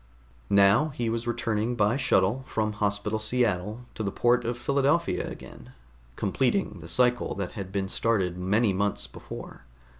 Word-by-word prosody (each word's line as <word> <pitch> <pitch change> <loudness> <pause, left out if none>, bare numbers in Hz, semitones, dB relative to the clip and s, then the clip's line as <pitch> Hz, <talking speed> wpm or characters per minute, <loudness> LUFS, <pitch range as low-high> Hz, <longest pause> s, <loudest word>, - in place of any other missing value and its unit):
Now 100 +8 +5
he 120 -5 -2
was 115 +1 -3
returning 120 0 -1
by 105 0 +2
shuttle 130 -3 +2
from 110 -1 -1
Hospital 105 +1 -1
Seattle 110 -2 0
to - - -6
the 100 -2 -1
port 120 +2 +2
of 120 +1 -2
Philadelphia 140 +6 +1
again, - - -11 0.4
completing 125 - 0
the 85 - -10
cycle 125 +5 +1
that 95 -2 -4
had 95 -2 -7
been 100 -1 -1
started 95 -4 0
many 100 +4 +1
months 100 +2 0
before. - - -10
110 Hz, 150 wpm, -27 LUFS, 100-120 Hz, 0.4 s, Now